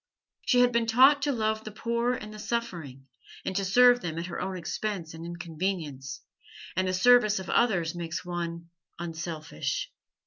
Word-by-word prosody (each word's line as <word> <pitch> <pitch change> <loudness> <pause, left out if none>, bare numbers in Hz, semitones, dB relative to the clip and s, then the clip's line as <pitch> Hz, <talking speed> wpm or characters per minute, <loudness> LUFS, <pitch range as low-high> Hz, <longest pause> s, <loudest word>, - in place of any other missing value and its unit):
She 250 -2 +5
had 245 0 +5
been 235 -1 +1
taught 265 +5 +6
to 285 0 +1
love 220 -3 0
the 215 - -6
poor 235 +3 -1
and 215 -4 -6
the 215 - -9
suffering, 170 - -4 0.4
and 190 - -2
to 200 - +1
serve 245 +5 +6
them 165 -2 -4
at 170 - -3
her 180 - -5
own 190 -1 -3
expense 175 0 -4
and 165 0 -8
inconvenience, 170 -5 -4 0.5
and 185 +1 +1
the 185 - 0
service 215 +1 +5
of 190 -1 -4
others 185 -9 +2
makes 170 0 -5
one 170 -1 -4 0.3
unselfish. 170 - -4
190 Hz, 170 wpm, -28 LUFS, 170-235 Hz, 0.5 s, taught